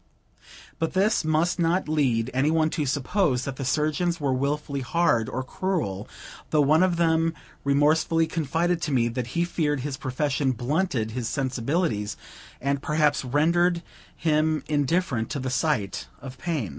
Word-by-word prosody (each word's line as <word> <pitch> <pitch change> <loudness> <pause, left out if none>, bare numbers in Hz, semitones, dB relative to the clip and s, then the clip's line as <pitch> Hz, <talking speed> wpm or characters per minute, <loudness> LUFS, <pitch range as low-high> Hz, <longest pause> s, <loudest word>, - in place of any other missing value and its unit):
But 165 - -1
this 195 +2 +2
must 155 +3 +1
not 170 +2 +1
lead 130 -6 +1
any 135 +3 +2
one 160 0 +2
to 150 -3 -1
suppose 140 -1 +1
that 135 -2 -5
the 135 - -4
surgeons 155 +5 0
were 140 -3 0
willfully 140 +2 -1
hard 125 -5 +1
or 130 - -3
cruel, 160 - -3 0.4
though 155 - +3
one 155 +4 +4
of 185 -2 +3
them 165 -1 +2 0.3
remorsefully 150 +3 +3
confided 165 +2 -1
to 155 - -2
me 120 -3 +2
that 120 0 -3
he 170 - +3
feared 150 -5 -1
his 135 0 -4
profession 135 +1 0
blunted 130 -2 -1
his 120 -1 -3
sensibilities, 130 - -1 0.4
and 140 +1 -1
perhaps, 150 -1 +1
rendered 170 +6 +2 0.3
him 155 -1 +1
indifferent 145 -5 0
to 140 - -3
the 130 0 -3
sight 125 - -1
of 130 -2 -10
pain. 155 - -2
150 Hz, 155 wpm, -25 LUFS, 130-165 Hz, 0.4 s, one